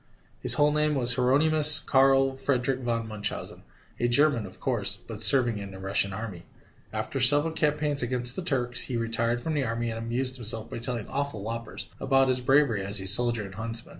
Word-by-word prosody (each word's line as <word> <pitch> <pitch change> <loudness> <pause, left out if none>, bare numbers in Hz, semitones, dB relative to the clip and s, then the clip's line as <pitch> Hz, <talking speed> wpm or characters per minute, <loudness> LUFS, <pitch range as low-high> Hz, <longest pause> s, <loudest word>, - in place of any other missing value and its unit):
His - - +4
whole 145 0 +2
name 150 0 0
was 125 -2 +3
Hieronymus 150 +4 +5
Karl 135 -2 +1
Friedrich 130 -1 -2
von 115 -2 -4
Munchausen, 105 -1 -5 0.4
a 120 - 0
German, 120 -3 +1
of 95 - -16
course, 105 -6 -3
but 110 -2 -9
serving 120 -1 +5
in 100 -1 -9
the 95 - -12
Russian 95 +1 0
army. 100 -3 -8 0.5
After 135 - -5
several 145 +5 +5
campaigns 150 -2 -1
against 125 0 -1
the - - -5
Turks, 125 -8 0
he 125 - -5
retired 115 +1 -2
from 160 - -4
the 145 -2 -2
army 115 -1 -4
and 115 - -7
amused 125 +3 -1
himself 115 -2 -3
by - - -7
telling 115 -2 -2
awful 140 -7 -5
whoppers 115 +1 -7
about 135 -1 +1
his 130 0 +1
bravery 130 -6 +1
as 100 +2 0
a 95 - -6
soldier 115 +3 +3
and 95 - -12
huntsman. 115 +2 -5
120 Hz, 195 wpm, -25 LUFS, 115-135 Hz, 0.5 s, Hieronymus